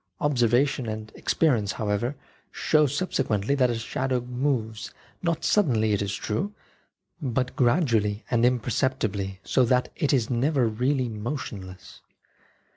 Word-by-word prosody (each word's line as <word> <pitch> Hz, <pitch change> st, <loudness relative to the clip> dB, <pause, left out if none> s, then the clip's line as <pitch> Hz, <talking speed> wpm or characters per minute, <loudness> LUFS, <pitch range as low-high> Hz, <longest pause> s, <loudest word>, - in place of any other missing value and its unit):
Observation 130 Hz, -1 st, +2 dB
and 110 Hz, 0 st, -6 dB
ex -, -, -2 dB
perience, 115 Hz, -11 st, +2 dB
however, 110 Hz, +4 st, -1 dB, 0.4 s
show 155 Hz, -1 st, +3 dB
subsequently 135 Hz, -, 0 dB
that 130 Hz, -3 st, +3 dB
a 120 Hz, -, 0 dB
shadow 130 Hz, +3 st, -1 dB
moves 125 Hz, -3 st, -2 dB, 0.3 s
not 170 Hz, -2 st, -1 dB
suddenly, 115 Hz, -, +3 dB
it 100 Hz, -, +1 dB
is 100 Hz, 0 st, -2 dB
true, 195 Hz, -, -3 dB, 0.7 s
but 125 Hz, -2 st, -1 dB
gradu 120 Hz, -, +3 dB
ally 105 Hz, +1 st, -3 dB
and 120 Hz, -1 st, +2 dB
imperceptibly, 115 Hz, -5 st, 0 dB
so 130 Hz, -, +2 dB
that 125 Hz, +1 st, +2 dB
it 145 Hz, -, 0 dB
is 125 Hz, -6 st, +2 dB
never 130 Hz, +2 st, +1 dB
really 125 Hz, +4 st, 0 dB
motionless. 105 Hz, -5 st, -6 dB
120 Hz, 130 wpm, -26 LUFS, 110-135 Hz, 0.7 s, show